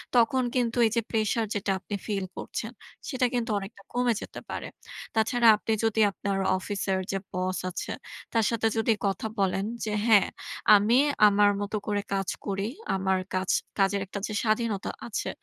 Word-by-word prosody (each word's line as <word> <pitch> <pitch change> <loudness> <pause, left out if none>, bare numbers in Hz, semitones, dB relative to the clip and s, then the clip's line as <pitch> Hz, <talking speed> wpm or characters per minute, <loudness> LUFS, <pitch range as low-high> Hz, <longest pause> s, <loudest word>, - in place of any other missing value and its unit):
তখন 245 +2 +4
কিন্তু 240 -1 +1
এই 220 - +2
যে 230 - +3
pressure 220 0 +1
যেটা 200 -1 0
আপনি 205 - -5
feel 200 -3 -1
করছেন - - -5 0.4
সেটা 260 -3 +1
কিন্তু 240 -1 -1
অনেকটা 200 0 -10
কমে 245 -1 +2
যেতে - - -8
পারে। - - -4 0.5
তাছাড়া 230 +2 +3
আপনি 220 - -4
যদি 225 0 +1
আপনার 195 0 -2 0.2
অফিসের 195 0 -2
যে 195 - 0 0.2
boss 185 0 -1
আছে 180 - -5 0.4
তার 225 -2 +3
সাথে 225 -1 +1
যদি 225 0 +3
কথা 195 +3 -2
বলেন 195 0 +1 0.2
যে 215 - -2 0.2
হ্যাঁ, 210 -4 +6 0.5
আমি 210 +4 +4 0.3
আমার 205 0 +5
মতো 205 +1 -3
করে 205 -1 0
কাজ 195 -2 -1 0.2
করি, 195 0 -1 0.3
আমার 190 0 +1 0.2
কাজ, 185 0 -1 0.3
কাজের 195 0 +2
একটা 200 +2 -6
যে 215 - -5
স্বাধীনতা 215 -2 0 0.2
আছে 220 - -3
210 Hz, 165 wpm, -27 LUFS, 195-230 Hz, 0.5 s, হ্যাঁ